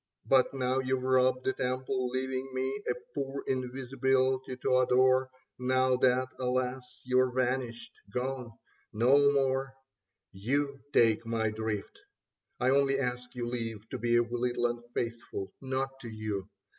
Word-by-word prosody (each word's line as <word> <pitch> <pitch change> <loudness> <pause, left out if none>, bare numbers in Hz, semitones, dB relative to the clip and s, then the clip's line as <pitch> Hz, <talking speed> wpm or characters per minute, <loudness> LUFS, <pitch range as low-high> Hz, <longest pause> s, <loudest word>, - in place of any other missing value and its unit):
But 130 -2 +4
now 130 -1 0
you've 130 0 -1
robbed 130 0 +3
the 130 - +2
temple, 130 0 -1
leaving 130 +1 -2
me 130 +1 -2
A 125 - +1 0.2
poor 140 -1 -3
invisibility 130 0 0
to 130 0 +2
adore, 130 +1 +4 0.3
Now 130 0 +3
that, 130 0 +3
alas, 125 0 -2
you're 130 0 +3
vanished, 125 -2 -2 0.2
gone... 125 0 -3 0.4
no 135 +6 +5
more; 135 -1 0 0.6
You 140 +8 -1
take 115 -3 +4
my 115 -1 0
drift. 110 - -4 0.6
I 130 +1 +3
only 135 0 +3
ask 125 -1 -3
your 120 -1 -3
leave 115 -3 -4
To - - -4
be 120 0 +3
a 120 - +4
little 120 +1 -1
unfaithful 120 -4 -4
— - - -51
not 135 0 -3
to 120 - -8
you. 105 -3 -4
130 Hz, 140 wpm, -30 LUFS, 120-130 Hz, 0.6 s, no